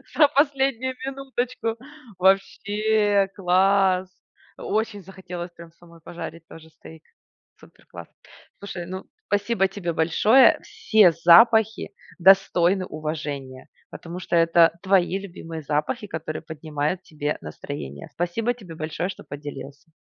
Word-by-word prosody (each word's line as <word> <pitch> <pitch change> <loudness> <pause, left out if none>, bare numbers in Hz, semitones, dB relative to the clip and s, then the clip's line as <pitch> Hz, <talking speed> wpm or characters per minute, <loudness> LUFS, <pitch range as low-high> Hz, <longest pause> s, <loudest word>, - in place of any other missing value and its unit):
за 300 -1 +6
последнюю 270 -3 +1
минуточку. 255 -4 -3 0.4
Вообще 205 +2 +2
класс! 190 0 +2 0.5
Очень 215 -1 -2
захотелось 180 -1 -8
прям 170 -1 -14
самой 170 -1 -19
пожарить 165 0 -8
тоже 160 0 -13
стейк. 160 0 -15 0.6
Супер - - -20
класс! - - -11 0.5
Слушай, 190 -3 -7
ну, 185 +1 -7 0.2
спасибо 205 0 +1
тебе 180 -3 -4
большое! 210 +10 +4
Все 215 -5 +3
запахи 220 +7 +5 0.3
достойны 190 0 +4
уважения, 145 -5 -6 0.2
потому 170 +1 -8
что 185 - -2
это 165 0 +4
твои 190 -1 +2
любимые 165 -4 -8
запахи, 155 - -2
которые 160 -3 -5
поднимают 155 +2 -4
тебе 150 -3 -4
настроение. 70 -2 -8
Спасибо 215 +8 -1
тебе 195 -9 -12
большое, 160 +3 -3
что - - -9
поделился. 145 0 -9
180 Hz, 115 wpm, -23 LUFS, 160-205 Hz, 0.6 s, за